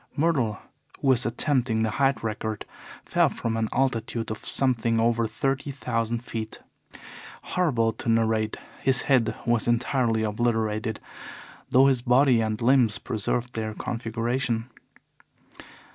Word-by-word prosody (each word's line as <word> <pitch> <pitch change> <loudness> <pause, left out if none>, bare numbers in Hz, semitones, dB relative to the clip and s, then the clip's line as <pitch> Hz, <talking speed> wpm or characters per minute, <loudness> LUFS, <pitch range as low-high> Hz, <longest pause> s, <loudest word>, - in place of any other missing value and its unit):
Myrtle, 140 -9 +1 0.4
who 135 - +1
was 125 -2 +3
attempting 120 -2 +1
the 110 - 0
height 135 +2 +1
record, 110 -1 -3 0.4
fell - - +3
from 115 -1 -3
an 110 -1 -1
altitude 115 -3 -1
of 110 - -6
something 115 -4 +1
over 115 0 +2
thirty 135 +4 -2
thousand 120 -4 -2
feet. 110 -2 -5 0.8
Horrible 120 -11 +1
to 115 - -5
narrate, 110 -1 +1 0.2
his 130 -1 +2
head 120 -5 +2
was 120 -1 +1
entirely 120 -1 +1
obliterated, 110 -1 -1 0.7
though 130 +2 +5
his 135 -3 +3
body 125 0 +4
and 110 -1 -1
limbs 120 -4 +4
preserved 120 +1 -2
their 110 -1 -4
configuration. 120 +1 -2
115 Hz, 125 wpm, -26 LUFS, 110-130 Hz, 0.8 s, though